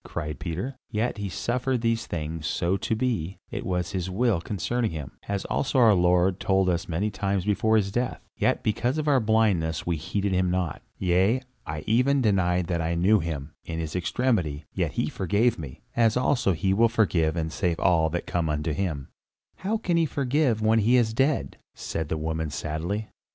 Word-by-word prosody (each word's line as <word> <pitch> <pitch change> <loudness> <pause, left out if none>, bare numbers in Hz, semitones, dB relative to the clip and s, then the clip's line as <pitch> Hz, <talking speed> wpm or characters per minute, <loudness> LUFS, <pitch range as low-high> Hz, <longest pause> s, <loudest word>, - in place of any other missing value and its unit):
cried 75 -4 -5
Peter. 95 +11 -4
"Yet 110 +1 -1
he 100 -1 -3
suffered 120 +7 -1
these 115 0 0
things 80 -1 -4
so 85 +3 0
to 100 +3 -1
be; 110 -7 -1
it - - -4
was 90 -2 -2
his 95 -1 -2
will 105 -2 +1
concerning 110 +6 -1
him, 75 -5 -6 0.2
as 100 -1 -2
also 135 - -1
our 115 -4 +7
Lord 90 +1 +3
told 95 -1 +2
us 85 -1 -1
many 95 +6 -1
times 100 -2 -1
before 110 +2 +2
his 100 -2 0
death, 120 +3 -1 0.2
yet - - +1
because 120 +6 0
of 155 -1 -2
our 140 -3 +5
blindness 105 -9 +1
we 85 -2 0
heeded 95 +5 -2
him 90 -1 +2
not. 90 -5 -1 0.2
Yea, 95 +8 +2 0.2
I 75 0 -4
even 125 +6 +3
denied 90 -6 +2
that 85 -1 -1
I 80 +1 -1
knew 100 +6 +4
him, 80 -3 -4
in 80 - -5
his 80 0 -4
extremity; 90 - 0
yet - - -1
he - - 0
forgave 105 +5 +1
me, 70 -5 -8
as 115 0 +3
also 125 -6 +2
he 95 +3 +1
will 115 +3 +4
forgive 90 -8 +2
and 80 -2 -2
save 85 0 0
all 85 -2 +3
that 85 +2 -3
come 85 -2 -1
unto 75 +1 -1
him." 75 -5 -3 0.5
"How 210 +4 -1
can 175 -6 0
he 165 -1 +3
forgive 135 -5 +1
when 110 +1 +4
he 115 +4 +4
is 110 -3 +2
dead?" 135 +5 0 0.2
said 80 -2 -4
the 80 - -1
woman 80 0 -2
sadly. 80 +10 -3
95 Hz, 195 wpm, -26 LUFS, 85-115 Hz, 0.5 s, our